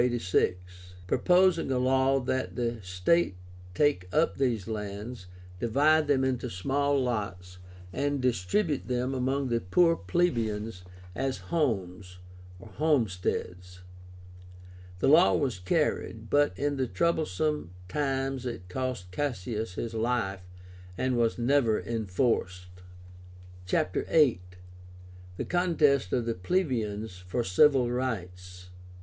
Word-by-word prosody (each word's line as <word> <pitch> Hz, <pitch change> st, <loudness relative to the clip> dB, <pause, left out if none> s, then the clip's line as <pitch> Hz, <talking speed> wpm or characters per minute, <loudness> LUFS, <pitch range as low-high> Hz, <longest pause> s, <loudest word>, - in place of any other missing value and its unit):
proposing 180 Hz, -, +3 dB
a 130 Hz, -, +1 dB
law 130 Hz, +1 st, +3 dB
that 130 Hz, 0 st, -2 dB
the 120 Hz, -2 st, -2 dB
state 90 Hz, -, +1 dB, 0.4 s
take 90 Hz, -9 st, +1 dB
up 155 Hz, +9 st, +2 dB
these 120 Hz, -8 st, 0 dB
lands, 105 Hz, 0 st, -6 dB, 0.3 s
divide 150 Hz, +7 st, +3 dB
them 135 Hz, -2 st, +2 dB
into 130 Hz, -2 st, -1 dB
small 140 Hz, +9 st, 0 dB
lots, 100 Hz, -7 st, -3 dB, 0.3 s
and 145 Hz, 0 st, -1 dB
distribute 130 Hz, -, 0 dB
them 125 Hz, +1 st, -1 dB
among 135 Hz, +1 st, -1 dB
the 115 Hz, -1 st, 0 dB
poor 165 Hz, -, +3 dB
plebeians 115 Hz, -, -1 dB, 0.3 s
as 135 Hz, +3 st, -2 dB, 0.2 s
homes 95 Hz, -, -1 dB, 0.6 s
(homesteads). 95 Hz, -, -1 dB, 1.2 s
The -, -, 0 dB
law 160 Hz, +6 st, +6 dB
was 130 Hz, -10 st, -1 dB
carried, 90 Hz, -, -1 dB
but 145 Hz, -10 st, +3 dB
in 145 Hz, +2 st, -1 dB
the 130 Hz, -1 st, 0 dB
troublesome 155 Hz, -, 0 dB, 0.2 s
times 135 Hz, +2 st, -2 dB
it 105 Hz, -7 st, -7 dB
cost 125 Hz, -5 st, -4 dB
Cassius 110 Hz, -4 st, -3 dB
his 115 Hz, +2 st, -4 dB
life, 115 Hz, -4 st, -1 dB, 0.6 s
and 130 Hz, -1 st, 0 dB
was 115 Hz, -1 st, +1 dB
never 120 Hz, -3 st, +2 dB
enforced. 95 Hz, -4 st, -1 dB, 1.0 s
CHAPTER 90 Hz, 0 st, 0 dB
VIII. 145 Hz, -, +3 dB, 1.0 s
THE -, -, -3 dB
CONTEST 155 Hz, -, +2 dB
OF 120 Hz, -2 st, 0 dB
THE 115 Hz, -, 0 dB
PLEBEIANS 110 Hz, -, -2 dB
FOR 120 Hz, +7 st, -1 dB
CIVIL 125 Hz, +5 st, +4 dB
RIGHTS. 90 Hz, -7 st, -5 dB
125 Hz, 110 wpm, -28 LUFS, 95-140 Hz, 1.2 s, law